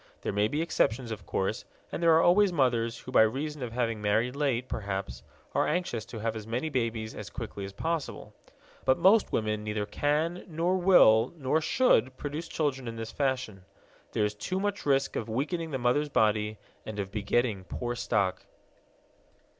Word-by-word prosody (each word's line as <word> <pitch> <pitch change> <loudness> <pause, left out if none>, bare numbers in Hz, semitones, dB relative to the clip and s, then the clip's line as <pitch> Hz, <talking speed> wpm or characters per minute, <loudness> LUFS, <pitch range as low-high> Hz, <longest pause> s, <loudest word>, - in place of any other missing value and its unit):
There - - -2
may 105 +1 +2
be 150 +8 -1
exceptions, 120 -7 0
of 100 -6 -7
course, - - -1 0.3
and - - -4
there 165 -1 +6
are 165 - +5
always 195 +2 +5
mothers 120 -6 +1
who, 130 - -9
by - - +6
reason 140 +7 0
of 120 -2 -4
having 115 -2 -1
married 110 +5 +1
late, 130 -4 0
perhaps, 95 - -4 0.3
are - - +2
anxious 120 - -1
to 115 - -9
have 110 +1 -2
as 110 -1 -7
many 125 +8 -2
babies 115 -5 -2
as 105 - -7
quickly 110 -5 -6
as 100 - -7
possible. 165 +6 -3 0.5
But 130 - +3
most 205 +3 +4
women 110 -1 -1
neither 105 -1 -2
can 150 - 0
nor 170 +2 0
will 135 - +5
nor 150 +2 +1
should 155 - +2
produce 150 +3 -5
children 135 -5 -2
in 115 - -5
this 115 0 -6
fashion. 130 -8 -2 0.5
There 105 - +2
is 105 - -1
too 145 - -3
much 205 -4 -2
risk 135 -1 +2
of 115 - -3
weakening 160 +8 -2
the 135 - -2
mother's 130 +4 +1
body 105 -3 +1 0.3
and 110 -1 -7
of 100 -1 -3
begetting 105 -1 0
poor 120 +5 -3
stock. 100 -6 -1
120 Hz, 180 wpm, -29 LUFS, 110-150 Hz, 0.5 s, there